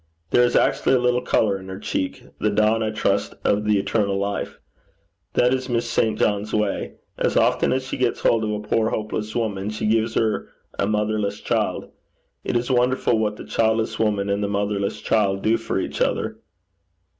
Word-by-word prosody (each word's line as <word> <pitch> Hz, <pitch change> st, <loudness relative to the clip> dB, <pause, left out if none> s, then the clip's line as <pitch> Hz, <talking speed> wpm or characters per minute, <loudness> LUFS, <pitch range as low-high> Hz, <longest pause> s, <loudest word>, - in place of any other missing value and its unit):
There 125 Hz, -, +5 dB
is 120 Hz, 0 st, +3 dB
actually -, -, +3 dB
a -, -, +3 dB
little 125 Hz, 0 st, +2 dB
colour 100 Hz, -3 st, +1 dB
in 95 Hz, -, -11 dB
her 95 Hz, -, -6 dB
cheek 95 Hz, -, -3 dB, 0.2 s
the 105 Hz, -, +1 dB
dawn, 110 Hz, +2 st, +2 dB
I 110 Hz, -, 0 dB
trust, 110 Hz, -, 0 dB
of 105 Hz, +1 st, +1 dB
the 105 Hz, -1 st, +3 dB
eternal 100 Hz, 0 st, 0 dB
life. 100 Hz, +1 st, -3 dB, 0.8 s
That 125 Hz, +1 st, +3 dB
is 130 Hz, 0 st, -2 dB
Miss 120 Hz, -1 st, 0 dB
St. 110 Hz, -2 st, +1 dB
John's 105 Hz, +1 st, 0 dB
way. 105 Hz, -2 st, -1 dB, 0.2 s
As -, -, +1 dB
often -, -, +3 dB
as 130 Hz, 0 st, 0 dB
she 135 Hz, -, -4 dB
gets 125 Hz, -2 st, 0 dB
hold 115 Hz, -1 st, +3 dB
of 110 Hz, -, -1 dB
a 105 Hz, 0 st, -2 dB
poor 110 Hz, +1 st, +1 dB
hopeless 105 Hz, 0 st, -3 dB
woman, 105 Hz, -4 st, -1 dB
she 105 Hz, 0 st, -3 dB
gives 110 Hz, +1 st, +1 dB
her 110 Hz, -2 st, 0 dB, 0.3 s
a -, -, +2 dB
motherless 105 Hz, -1 st, -1 dB
child. -, -, -1 dB, 0.5 s
It -, -, 0 dB
is 120 Hz, +2 st, -2 dB
wonderful 125 Hz, -2 st, +2 dB
what 105 Hz, -1 st, 0 dB
the -, -, -9 dB
childless 110 Hz, 0 st, 0 dB
woman 105 Hz, -3 st, +1 dB
and 100 Hz, +1 st, 0 dB
motherless 100 Hz, -1 st, -1 dB
child 100 Hz, -3 st, +1 dB
do 110 Hz, +1 st, +3 dB
for 115 Hz, -3 st, -2 dB
each -, -, -4 dB
other.' -, -, 0 dB
110 Hz, 190 wpm, -23 LUFS, 105-115 Hz, 0.8 s, There